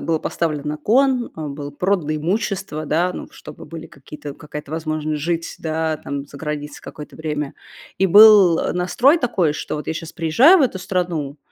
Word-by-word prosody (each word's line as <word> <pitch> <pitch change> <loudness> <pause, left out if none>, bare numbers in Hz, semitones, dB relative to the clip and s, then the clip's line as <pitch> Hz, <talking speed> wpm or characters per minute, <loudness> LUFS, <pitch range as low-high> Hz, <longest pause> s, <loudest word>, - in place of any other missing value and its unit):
было 165 -1 +1
поставлено 155 -3 -2
на 150 - -3
кон, 255 - +2
м, 150 -3 -5
было 145 0 -6
продано 170 0 -1
имущество, 180 -1 -2
да, 175 +5 +1
ну, - - -8
чтобы - - -12
были 165 0 -9
какие-то 145 +1 -10
какая-то 150 0 -9
возможность 155 -1 -3
жить 165 +2 -1
с - - -8
да, 160 -1 -2
там, 140 0 -5
за 145 - -13
границей 150 -1 -5
какое-то 150 - -10
время. 150 -2 -3 0.5
И 195 - +3
был, 200 -3 +8
э, - - -1
настрой 240 - +3
такой, 190 - +1
что 150 - -5
вот 150 - -5
я - - -1
щас 160 +1 -7
приезжаю 230 - +5
в 300 - +3
эту 225 -7 0
страну, 175 -6 -2
160 Hz, 190 wpm, -20 LUFS, 150-185 Hz, 0.5 s, был